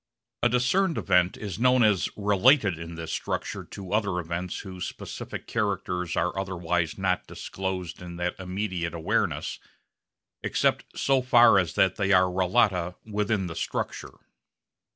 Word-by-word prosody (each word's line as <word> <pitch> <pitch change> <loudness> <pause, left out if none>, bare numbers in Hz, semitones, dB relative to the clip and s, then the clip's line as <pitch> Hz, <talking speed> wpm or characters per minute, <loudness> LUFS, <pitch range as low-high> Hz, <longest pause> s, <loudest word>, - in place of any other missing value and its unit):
A 120 - +4
discerned 155 +10 +2
event 90 0 +2
is 100 -4 -6
known 125 0 +4
as 105 -4 +3
related 105 - +4
in 85 0 -7
this 80 -1 -5
structure - - -3
to 95 -1 -8
other 100 -4 +1
events 85 +1 -4
whose 95 -2 -7
specific - - -7
characters 95 -5 -2
are 85 +2 0
otherwise 90 -4 -1
not 95 -2 0
disclosed 95 -3 -5
in 90 -1 -8
that 90 +1 -3
immediate 90 -3 -3
awareness 80 - -1 0.8
except - - 0
so 135 -1 +2
far 120 -5 +6
as 90 -3 -2
that 95 -1 +3
they 100 -2 +1
are 95 -1 +6
relata 90 -1 +2
within 105 -2 -1
the 85 -2 -6
structure. - - -4
95 Hz, 140 wpm, -27 LUFS, 90-105 Hz, 0.8 s, far